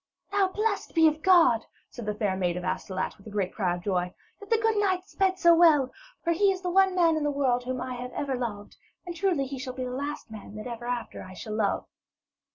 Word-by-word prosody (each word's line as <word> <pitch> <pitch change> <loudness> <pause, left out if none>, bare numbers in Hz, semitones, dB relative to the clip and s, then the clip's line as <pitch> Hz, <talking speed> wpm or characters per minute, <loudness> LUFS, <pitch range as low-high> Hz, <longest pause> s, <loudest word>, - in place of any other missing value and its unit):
'Now, 400 -1 +3
blessed 415 +1 -2
be 325 -1 +6
God,' 315 -9 +4 0.2
said 235 -4 -8
the 210 - -1
fair 205 -3 0
maid 180 -2 -1
of 180 - -5
Astolat, 185 +1 -3
with 195 - -15
a - - -6
great 200 -3 -2
cry 180 -5 0
of 175 - -9
joy, 180 -2 0 0.3
'that 405 - -12
the 455 - +4
good 450 0 +1
knight 380 -3 +1
sped 380 -1 0
so 340 -2 +6
well; 315 -6 +5 0.3
for 335 - +2
he 395 +4 +3
is 375 -1 -4
the 360 -1 -2
one 380 0 +4
man 335 -3 +4
in 310 - -1
the 295 - +1
world 260 -4 +1
whom 255 0 -3
I 255 - -4
have 250 +1 -6
ever 275 -2 -2
loved, 220 -5 -5 0.3
and 350 -1 -6
truly 340 -6 +1
he 270 0 -6
shall 255 -1 -5
be 255 0 -4
the 250 - -4
last 280 -2 -5
man 210 -1 -10
that 215 - -7
ever 240 -1 -6
after 245 -1 -4
I 185 0 -10
shall 215 +3 -6
love.' 215 -2 0
260 Hz, 245 wpm, -27 LUFS, 215-360 Hz, 0.3 s, be